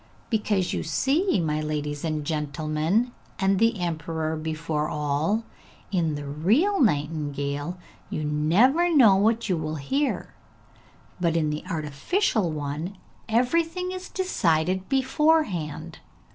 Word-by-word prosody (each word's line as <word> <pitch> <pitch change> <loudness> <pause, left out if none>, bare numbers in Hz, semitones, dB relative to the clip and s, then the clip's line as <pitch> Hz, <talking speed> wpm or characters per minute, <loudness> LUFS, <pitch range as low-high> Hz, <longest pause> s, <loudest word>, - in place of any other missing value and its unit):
'Because 210 -4 +1
you - - -1
see, 275 - +1
my 155 -2 0
ladies 150 -1 -3
and 155 -2 -2
gentlemen, 155 - 0 0.3
and 195 0 +2
the 230 -2 +2
emperor 160 -2 -2
before 155 0 -2
all, 150 +8 0 0.5
in 165 -5 +1
the 145 0 -5
real 215 - +2
nightingale 145 - -1 0.3
you 155 - -3
never 210 - +3
know 240 - +7
what 220 +4 +2
you 185 - +1
will 155 0 -3
hear, 270 - -1 0.9
but 170 -2 +1
in 155 -2 +1
the 150 - -4
artificial 170 - 0
one 155 +5 -4 0.3
everything 330 +10 +1
is 370 0 -6
decided 185 - 0
beforehand! 260 - +1
165 Hz, 115 wpm, -25 LUFS, 150-230 Hz, 0.9 s, know